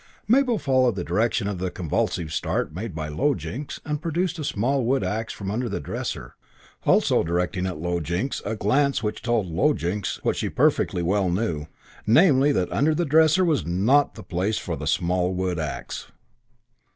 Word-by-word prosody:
Mabel 245 0 +3
followed 130 - +2
the 90 - -3
direction 110 +4 0
of 100 -3 -3
the 95 0 -1
convulsive 80 -1 -2
start 75 - -1
made 95 +1 -5
by 80 -1 -3
Low 135 - +1
Jinks 140 +5 -6
and 150 -1 -2
produced 170 +2 -1
the 155 - -4
small 130 +2 0
wood 130 +3 +1
axe 110 +1 -2
from 100 -1 -5
under 120 +3 -2
the 100 - -3
dresser, 70 - -5 0.5
also - - +4
directing 90 +2 -1
at 90 - -4
Low 85 +2 -1
Jinks 85 - -2
a 110 +3 -2
glance 135 +5 +1
which 105 - -2
told 120 -4 +1
Low 95 - +2
Jinks 90 +3 -3
what - - +1
she - - -2
perfectly 90 - +1
well 95 +1 +1
knew: 85 -6 -1 0.4
namely 140 - +5
that 90 -10 0
under 155 +2 +2
the 175 - 0
dresser 160 +4 +4
was 155 - +1
not 105 - +2
the 110 - -9
place 95 +4 -1
for 85 - -3
the 75 0 -5
small 90 +2 +1
wood 90 -2 -1
axe. 75 -3 -5
105 Hz, 185 wpm, -24 LUFS, 90-140 Hz, 0.5 s, namely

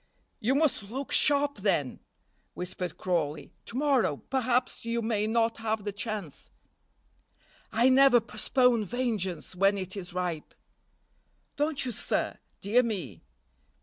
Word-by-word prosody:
"You 250 +5 +1
must 280 -9 +1
look 265 +4 -5
sharp 285 -1 +4
then," 190 -10 0 0.6
whispered 180 -1 -4
Crawley; 160 -5 -2
"to 235 - -5
morrow 270 - +2
perhaps 255 -1 0
you 230 0 -2
may 215 -2 0
not 230 0 +1
have 220 -1 -2
the 205 - -3
chance." 205 - -5 1.2
"I 230 +3 +3
never 260 -1 +6
postpone 235 +1 +2
vengeance 205 -7 -2
when 195 +2 +3
it 185 0 -5
is 185 -3 -7
ripe." 180 -3 -4 1.0
"Don't 295 -1 0
you, 250 - -2
sir? 215 - -1 0.2
dear 225 +5 +3
me." 180 - -4
220 Hz, 125 wpm, -28 LUFS, 185-250 Hz, 1.2 s, never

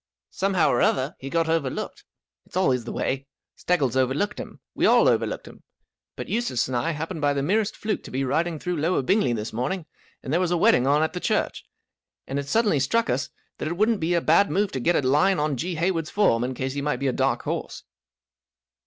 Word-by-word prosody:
" - - -69
Somehow 190 -3 +2
or 120 - +1
other, 135 +4 +1
he 135 - -6
got 165 +2 +1
over¬ 160 -5 0
looked. - - -6 0.4
It's - - -6
always 130 -10 +2
the - - -5
way. 135 +1 -2 0.3
Steggles 140 -9 0
overlooked 130 +11 0
him. - - -8
We - - +2
all - - +5
overlooked - - 0
him. - - -13 0.5
But - - -6
Eustace 230 - 0
and 130 - -3
I 125 +7 0
happened 160 +1 -4
by 145 0 +2
the 140 -1 -1
merest 210 +6 0
fluke 215 0 -2
to - - -8
be 135 +1 -2
riding 160 +5 0
through 180 +2 -3
Lower 165 -3 +1
Bingley 190 - +2
this 110 -1 -4
morning, 155 - -2 0.4
and 135 - -3
there 170 - +3
.was 180 -2 +1
a 175 - +1
wedding 130 -5 +4
on 145 +2 +3
at 160 - -1
the 180 - -3
church, - - -1 0.6
and 135 +1 -3
it 140 - -5
suddenly 210 -3 +2
struck 230 - +1
us 130 +2 -1 0.3
that - - -3
it 170 +2 -3
wouldn't 215 +1 +2
be 170 +2 0
a 170 - +2
bad 170 +6 +4
move 205 0 0
to 130 - -3
get 170 +7 +2
a 130 - +1
line 180 +8 +3
on 150 -1 0
G. 170 +7 -3
Hayward's 165 -1 -1
form, 160 - +2
in 130 +1 -3
case 130 +1 -3
he 140 - -3
might 150 +1 -1
be 140 - -4
a 130 - +1
dark - - 0
horse." - - -4
155 Hz, 230 wpm, -24 LUFS, 135-180 Hz, 0.6 s, all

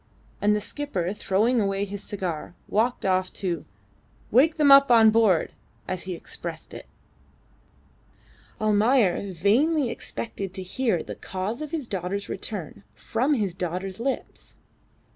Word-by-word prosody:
And 210 +1 +4
the 210 - -1
skipper, 200 - -3
throwing 215 +4 +1
away 195 0 0
his 200 0 -7
cigar, 180 -5 -4
walked 230 +2 0
off 185 -1 +1
to 175 -5 -3 0.7
"wake 295 +8 +4
them 295 -2 +5
up 275 0 +8
on 225 -2 +7
board," 215 -7 +3 0.3
as 185 -1 -4
he 185 -1 -4
expressed - - -7
it. - - -9 1.7
Almayer 210 -2 +2
vainly 240 - +2
expected 195 -6 -6
to 190 - -4
hear 225 +1 0
of - - -10
the - - -5
cause 195 +7 -4
of 305 - -4
his 305 -3 -3
daughter's 195 -1 -3
return 210 +1 -6
from 260 +6 0
his 205 -7 -1
daughter's 185 +2 -4
lips. 265 +3 -4
205 Hz, 140 wpm, -25 LUFS, 185-240 Hz, 1.7 s, up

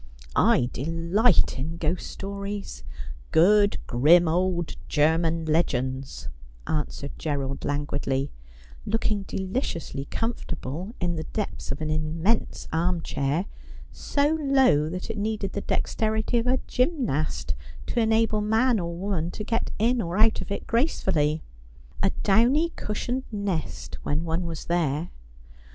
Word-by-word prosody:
' - - -19 0.2
I 120 - +2
delight 165 - +2
in 160 +5 -3
ghost 170 +2 -1
stories 200 +1 -5 0.2
— - - -13
good 205 +4 +5
grim 160 +8 +5
old 175 0 0
German 160 +2 +2
legends,' 135 -4 -1 0.4
answered 150 -2 -2
Gerald 140 -3 -2
languidly, 145 -1 -1 0.5
looking 215 -1 0
deliciously 190 - -3
comfortable 185 - -4
in 175 -2 0
the 160 - -3
depths 210 -8 -4
of 135 - -5
an 155 0 -1
immense 160 +8 0
armchair, 165 -2 0 0.5
so 295 +2 +1
low 265 - +4
that 185 +5 -4
it 215 - -5
needed 210 -2 -2
the 200 - -2
dexterity 220 +3 0
of 230 - -2
a 255 +1 +3
gymnast 250 - 0 0.3
to 240 - -1
enable 220 -1 +3
man 225 +2 +3
or 170 -1 -3
woman 180 -3 -1
to 210 - -5
get 225 +2 -1
in 235 +3 +2
or 175 0 -3
out 220 +1 +4
of - - -7
it 200 - -3
gracefully 165 - +1 0.3
— - - -15
^a 195 - +3
downy 245 +11 +4
cushioned 245 0 -3
nest 200 -6 -3
when 150 +3 -1
one 170 +1 -1
was 165 -2 -5
there. 165 -1 0
175 Hz, 135 wpm, -26 LUFS, 155-220 Hz, 0.5 s, good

